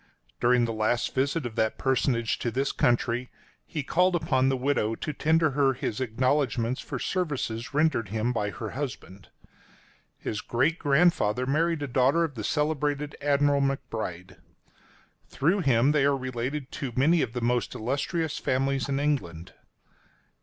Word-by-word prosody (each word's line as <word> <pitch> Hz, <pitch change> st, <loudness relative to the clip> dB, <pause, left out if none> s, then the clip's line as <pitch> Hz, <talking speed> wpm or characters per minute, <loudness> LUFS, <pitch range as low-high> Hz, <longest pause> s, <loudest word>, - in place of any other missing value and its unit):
During 120 Hz, 0 st, +3 dB
the 115 Hz, -, -3 dB
last 110 Hz, +2 st, 0 dB
visit 140 Hz, +3 st, 0 dB
of 120 Hz, -, -4 dB
that 110 Hz, 0 st, +1 dB
personage 125 Hz, -3 st, 0 dB
to 120 Hz, -, -1 dB
this 135 Hz, +4 st, -1 dB
country, 120 Hz, +1 st, +1 dB, 0.4 s
he 150 Hz, -4 st, -4 dB
called 180 Hz, +5 st, +2 dB
upon 130 Hz, -5 st, +2 dB
the 135 Hz, -, +1 dB
widow 125 Hz, -4 st, 0 dB
to 150 Hz, -, -4 dB
tender 160 Hz, +1 st, +2 dB
her 135 Hz, -1 st, +2 dB
his 125 Hz, -2 st, -4 dB
acknowledgments 130 Hz, 0 st, 0 dB
for -, -, -5 dB
services 135 Hz, -10 st, -2 dB
rendered 150 Hz, -9 st, +2 dB
him 110 Hz, +3 st, -1 dB
by 105 Hz, -3 st, -1 dB
her 110 Hz, 0 st, -6 dB
husband. 120 Hz, -8 st, -7 dB, 0.9 s
His 105 Hz, -, -4 dB
great 135 Hz, +9 st, 0 dB
grandfather 140 Hz, -7 st, +2 dB
married 155 Hz, +3 st, +1 dB
a -, -, -2 dB
daughter 135 Hz, +6 st, +3 dB
of 160 Hz, -3 st, -2 dB
the 110 Hz, -4 st, -6 dB
celebrated 150 Hz, +1 st, -1 dB
Admiral 145 Hz, 0 st, +2 dB
McBride. 110 Hz, -9 st, -3 dB, 0.9 s
Through 175 Hz, +8 st, +1 dB
him 135 Hz, -4 st, +3 dB
they 150 Hz, -2 st, +2 dB
are 140 Hz, 0 st, +3 dB
related 130 Hz, +2 st, -4 dB
to 135 Hz, -, -2 dB
many 160 Hz, +6 st, +3 dB
of 115 Hz, -3 st, -2 dB
the 125 Hz, -, -2 dB
most 120 Hz, +1 st, 0 dB
illustrious 145 Hz, +7 st, -2 dB
families 135 Hz, +1 st, 0 dB
in 135 Hz, 0 st, 0 dB
England. 90 Hz, -, -2 dB
135 Hz, 155 wpm, -27 LUFS, 120-145 Hz, 0.9 s, During